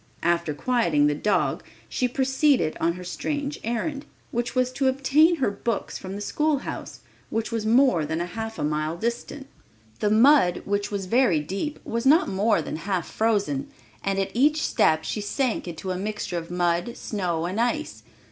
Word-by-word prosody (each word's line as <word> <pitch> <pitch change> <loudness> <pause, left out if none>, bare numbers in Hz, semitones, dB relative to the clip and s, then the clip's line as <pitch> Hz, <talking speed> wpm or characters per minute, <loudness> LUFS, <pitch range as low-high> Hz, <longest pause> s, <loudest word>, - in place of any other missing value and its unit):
After 170 -2 +1
quieting 170 -9 +2
the 150 - +3
dog, 150 -3 0 0.3
she 250 - 0
proceeded 265 - +2
on 170 +1 +1
her 180 +1 -8
strange 285 +9 -3
errand, 275 +6 -2 0.3
which 240 +1 -2
was 255 0 +2
to 265 +1 0
obtain 275 +6 +4
her 270 -9 0
books 205 +2 -3
from 190 +1 -7
the 205 - -5
schoolhouse, 300 +5 -2 0.3
which 225 +1 -2
was 225 -2 -2
more 240 - +4
than 160 +2 -2
half 220 +6 -4
a - - -3
mile 155 +2 -1
distant. 235 +6 -4 0.5
The 205 - +1
mud, 225 -3 +5
which 205 0 -1
was 200 -2 -3
very 215 -5 +3
deep, 195 - -4
was 230 +3 -1
not 315 +6 +5
more 195 -3 +1
than 155 - -4
half 180 0 -3
frozen, 205 -11 0 0.3
and 195 0 0
at 195 -1 -1
each 300 +6 +3
step 160 0 +2
she 210 - -3
sank 225 +1 -1
into 175 +2 -5
a 180 - -2
mixture 210 -3 -3
of 165 - -10
mud, 175 +5 0
snow 175 -6 -2
and 190 +6 -1
ice. 305 +6 -1
210 Hz, 175 wpm, -25 LUFS, 175-255 Hz, 0.5 s, mud